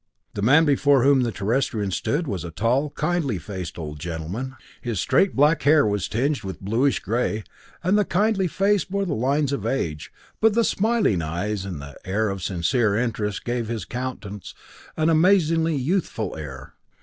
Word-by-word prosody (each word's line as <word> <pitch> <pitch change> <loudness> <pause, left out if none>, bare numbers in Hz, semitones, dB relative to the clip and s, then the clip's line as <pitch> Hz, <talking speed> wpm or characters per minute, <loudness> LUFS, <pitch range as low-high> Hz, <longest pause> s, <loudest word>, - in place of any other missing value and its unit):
The 100 - -4
man 145 +9 +5
before 140 -2 +4
whom 140 -1 +5
the 120 -2 0
Terrestrians 105 -1 -1
stood 160 +4 -1
was 100 - -3
a 85 - -5
tall, 120 - 0
kindly 150 - -1
faced 95 -1 -6
old 75 -3 -6
gentleman. 85 - -5 0.3
His 115 -6 -3
straight 195 - +2
black 150 +4 +4
hair 150 +1 +5
was 105 -3 0
tinged 135 +4 0
with 95 -4 -6
bluish 115 +8 +1
gray, 110 0 -1 0.4
and 190 +4 +3
the - - +4
kindly 195 0 +1
face 195 +2 +2
bore 200 +1 -2
the 170 - -2
lines 140 +4 +1
of 140 - -3
age, 75 - -2 0.3
but 220 -1 +4
the 235 - +4
smiling 215 - +1
eyes, 95 +5 -3
and 90 -6 -5
the 70 0 -10
air 105 +3 0
of 95 -1 -4
sincere 100 +5 +1
interest 110 -4 -2
gave 120 -1 -2
his 115 -1 -4
countenance 120 -6 -6 0.4
an 155 0 +2
amazingly 165 -1 +3
youthful 135 - -1
air. 65 -4 -8
120 Hz, 175 wpm, -23 LUFS, 100-155 Hz, 0.4 s, man